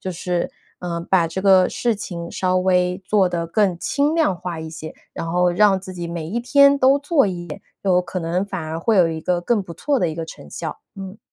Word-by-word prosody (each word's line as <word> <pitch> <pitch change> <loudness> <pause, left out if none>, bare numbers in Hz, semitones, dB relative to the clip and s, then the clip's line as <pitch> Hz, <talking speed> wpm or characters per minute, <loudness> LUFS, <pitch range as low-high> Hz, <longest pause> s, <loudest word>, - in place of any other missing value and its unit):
就 185 - -4
是 175 0 -2 0.3
呃， 170 -1 -4
把 180 -3 +4
这 165 +4 -5
个 190 -2 +5
事 235 -3 -1
情 170 -4 -6
稍 185 -1 0
微 180 0 +1
做 195 -1 +3
得 170 -2 -3
更 190 0 +1
轻 290 +2 0
量 315 - +2
化 175 -2 -5
一 160 0 -7
些， 160 -1 -8 0.2
然 165 - -5
后 180 0 +3
让 195 +1 +3
自 190 0 -9
己 175 -2 -5
每 170 -2 -5
一 220 +7 -2
天 280 +3 +5
都 275 +1 +4
做 290 -3 +2
一 175 -2 -5
点， 150 - -7 0.2
有 185 -2 +3
可 180 +1 -5
能 175 +3 -1
反 190 -3 -5
而 155 +1 -4
会 220 +6 +1
有 175 -3 +5
一 160 -1 -4
个 175 +2 0
更 215 +5 +1
不 175 -4 -8
错 280 - 0
的 180 - +1
一 160 - -4
个 165 0 -4
成 115 - -12
效， - - -6 0.2
嗯。 195 +1 -8
180 Hz, 255 characters per minute, -21 LUFS, 170-205 Hz, 0.3 s, 个